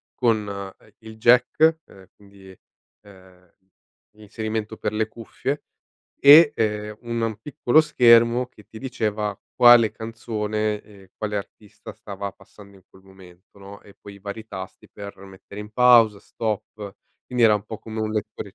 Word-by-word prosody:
con, 110 -4 0 0.3
ehm, 105 - -23
il 110 0 -12
jack 125 +8 +4
e 95 -1 -18
quindi, 100 -1 -17 0.5
ehm, 95 -3 -19 0.7
l'inserimento 110 +1 -5
per 105 - -3
le 110 0 -1
cuffie 120 +5 -5 0.6
e, 145 +2 +8
ehm, 105 -1 -3
un 115 -1 -4
un 110 -2 -2
piccolo 140 +3 +2
schermo 120 -4 +4
che 105 -4 -20
ti 110 - -11
diceva 105 -5 -3 0.2
quale 120 -3 +6
canzone 110 -2 -4
e 100 -3 -19
quale 105 -1 -4
artista 100 +1 -10
stava 100 -1 -8
passando 100 -1 -18
in 95 - -21
quel 95 - -21
momento, 95 -1 -19
no, 100 +1 -12
e 100 - -18
poi 100 - -13
i - - -15
vari 100 +2 -8
tasti 95 -3 -10
per 100 -1 -10
mettere 95 +1 -12
in 105 - -10
pausa, 115 -3 +5
stop, 110 0 -4 0.6
quindi 125 -1 +1
era 110 -2 +5
un 105 -1 -3
po' 110 0 -8
come 110 0 -7
un 110 0 -2
lettore 105 -2 -5
110 Hz, 155 wpm, -23 LUFS, 100-115 Hz, 0.7 s, e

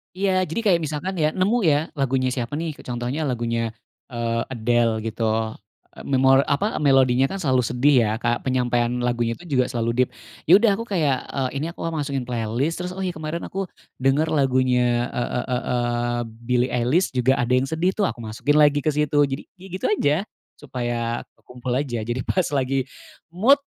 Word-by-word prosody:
Iya. 190 -1 +1
Jadi 170 +5 -3
kayak 195 -7 +3
misalkan, 155 +5 -3
ya, 155 -2 +1
nemu 195 +7 +1
ya. 145 -3 +4 0.2
Lagunya 135 -2 +1
siapa 120 +2 -4
nih, 165 -3 -3
ke - - -14
contohnya 125 +5 -3
lagunya, 115 -3 -1 0.4
eee, 115 -1 -1
Adele, 115 -1 +1
gitu. 115 +1 -3 0.7
Eee, - - -10
memor 135 0 +4
apa, 175 +10 0
melodinya 135 -1 +4
kan 195 - -4
selalu 130 -7 +2
sedih 125 +5 +3
ya? 105 - 0
Kayak 120 -1 -1
penyampaian 120 -2 +1
lagunya 120 -1 -1
tuh 175 - -12
juga 130 -5 +1
selalu 115 +1 +1
deep. - - -4 0.3
Ya 170 - +4
udah 225 -2 +4
aku 230 - -4
kayak, 160 - +1
eee, 130 -2 -1
ini - - -1
aku - - -19 0.2
masukin 140 -4 -2
playlist, 120 +6 -1
terus, 180 - -4
oh, 185 - -8
ya, 185 -3 -2
kemarin 155 +1 -4
aku 195 +1 -3 0.4
denger 140 +4 +3
lagunya 125 -4 +2
e 120 - 0
e - - -2
e 125 -1 0
eee, 120 0 0
Billy 120 +2 -1
Eilish 130 +6 +1
juga 130 +2 +2
ada 125 +1 +1
yang 130 +1 +1
sedih 175 +4 0
tuh, 210 - 0
aku 160 - -1
masukin 115 +7 0
lagi 145 -1 +4
ke 155 - +2
situ. 150 0 -1
Jadi, 135 0 -3
ya 190 +1 -13
gitu 185 +1 -4
aja. 145 -8 +2 0.4
Supaya 120 -4 -3 0.2
kekumpul 125 0 -7
aja. 125 -4 -1
Jadi 120 +3 -3
pas 185 -2 +1
lagi 135 -1 0 0.5
mood 235 +11 +5
130 Hz, 185 wpm, -23 LUFS, 120-155 Hz, 0.7 s, mood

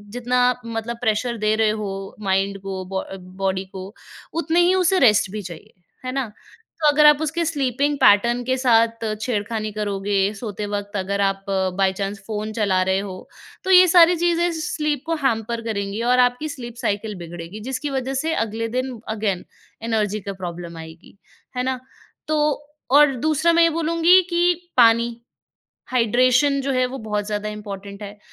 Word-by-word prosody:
जितना 245 +1 0 0.3
मतलब 230 +1 -4
प्रेशर 235 +1 0
दे 215 0 +1
रहे 220 -1 +3
हो 195 -1 -6
माइंड 195 0 0
को 190 -1 -5
बॉ 190 0 -3 0.4
बॉडी 190 0 0
को 190 +2 -8 0.5
उतने 330 +3 +1
ही 360 +2 +4
उसे 375 0 +3
रेस्ट 210 -6 +4
भी 215 - -4
चाहिए, 170 -4 -10 0.3
है 255 - -2
ना? 270 -1 -1 0.6
तो 300 - +4
अगर 300 +1 +5
आप 295 +1 +5
उसके 335 +2 -1
स्लीपिंग 285 -1 0
पैटर्न 235 +4 +4
के 260 0 0
साथ 230 -2 +2 0.2
छेड़खानी 215 -2 -2
करोगे, 205 -1 -2 0.2
सोते 210 -1 -5
वक़्त 205 0 -4
अगर 200 +1 -2
आप 195 0 0 0.3
बाई 190 -1 +2
चांस 200 +1 -3
फ़ोन 215 0 -4
चला 200 -4 +1
रहे 190 - +2
हो, 190 -2 -8 0.4
तो 380 - +1
ये 365 0 +8
सारी 345 0 +6
चीज़ें 345 0 +1
स्लीप 300 -3 -2
को 330 - 0
हैंपर 230 -1 0
करेंगी 200 +1 -3
और 250 - +3
आपकी 250 +5 +2
स्लीप 240 -4 -8
साइकिल 210 +1 -2
बिगड़ेगी, 170 +4 -8
जिसकी 290 +3 -3
वजह 265 -1 -2
से 320 - 0
अगले 225 +1 -4
दिन 255 -3 -3 0.2
अगेन 200 -4 -2 0.4
एनर्जी 215 -2 0
का 200 0 -5
प्रॉब्लम 170 -1 -6
आएगी, 160 +4 -12 0.4
है 250 - 0
ना? 260 0 -2 0.5
तो 310 -1 +1 0.5
और 285 -1 +6
दूसरा 315 +2 +2
मैं 335 0 +5
ये 335 - +5
बोलूँगी 335 +3 +4
कि 350 0 0
पानी, 235 0 +4 0.7
हाइड्रेशन 255 +4 +3
जो 275 0 -1
है 255 0 +2
वो 260 +2 -6
बहुत 210 -1 -2
ज़्यादा 210 0 -3
इम्पोर्टेंट 200 -1 -8
है। 205 0 -9
230 Hz, 170 wpm, -22 LUFS, 200-275 Hz, 0.7 s, ये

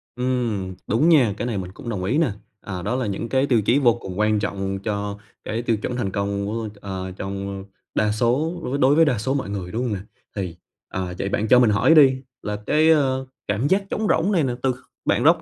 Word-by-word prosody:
Ừm, 120 -7 -1
đúng 145 +10 +3
nha, 130 -10 +5
cái 120 - -2
này 115 -5 -2
mình 90 -1 -5
cũng 120 - -8
đồng 95 -5 -3
ý 125 +11 +1
nè. 160 -9 +2 0.3
À, 90 -3 -5
đó 105 +7 -1
là 130 - -1
những 105 +3 -3
cái 135 +1 +2
tiêu 120 -5 +3
chí 120 +7 +3
vô 120 -4 +5
cùng 95 -5 -7
quan 105 0 +3
trọng 95 -1 -2
cho 100 -1 -2 0.3
cái 115 +2 -2
tiêu 115 -2 +1
chuẩn 120 +3 -4
thành 100 -6 -1
công 100 0 -1
của 110 +1 -3
ờ, 95 -2 -5
trong, 100 0 -4
ơ, 100 -1 -6 0.3
đa 105 -1 +2
số 130 +11 0
với 135 +3 -2
đối 140 +2 +4
với 165 - +6
đa 130 -7 +1
số 130 +6 -1
mọi 135 -8 -2
người, 95 -3 -4
đúng 120 +3 -2
hông 120 -4 -1
nè? 95 - -3 0.4
Thì, 90 -4 -3 0.3
à, 90 -1 -3
vậy 100 - -1
bạn 110 - 0
cho 125 +2 +7
mình 120 - +5
hỏi 105 +10 +4
đi 130 -3 +6 0.2
là 105 - -3
cái, 155 +1 +4
ơ, 135 -4 +3 0.2
cảm 105 +8 0
giác 195 +4 +2
trống 215 -1 -1
rỗng 190 +6 +2
này 170 -6 +3
nè 125 - 0
từ 130 - +3
kh - - -12 0.3
bạn - - +2
róc - - +5
115 Hz, 250 wpm, -23 LUFS, 100-130 Hz, 0.4 s, cho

